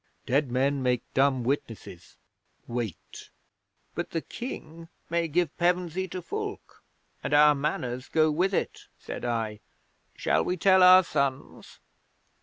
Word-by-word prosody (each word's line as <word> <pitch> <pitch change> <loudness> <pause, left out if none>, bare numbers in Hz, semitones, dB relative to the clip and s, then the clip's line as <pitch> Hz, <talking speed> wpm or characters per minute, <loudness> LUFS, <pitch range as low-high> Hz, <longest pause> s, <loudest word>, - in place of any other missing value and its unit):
Dead 135 0 +1
men 135 +2 +1
make 125 -2 0
dumb 135 -2 +2
witnesses. 115 -8 -5 0.5
Wait." 115 -6 -6 0.6
'"But - - -4
the 165 - -2
King 165 - -8 0.2
may 170 0 +1
give 170 +2 0
Pevensey 180 +1 0
to 185 0 -7
Fulke. 420 -1 -6 0.4
And - - 0
our 150 0 +7
Manors 130 -3 -3
go 155 -1 +2
with 180 +6 +1
it," - - -3
said - - -8
I. 115 -3 -2 0.6
"Shall - - +1
we 180 - -2
tell 190 +2 +5
our 185 +1 +8
sons?" 140 -4 -3
150 Hz, 130 wpm, -27 LUFS, 125-180 Hz, 0.6 s, our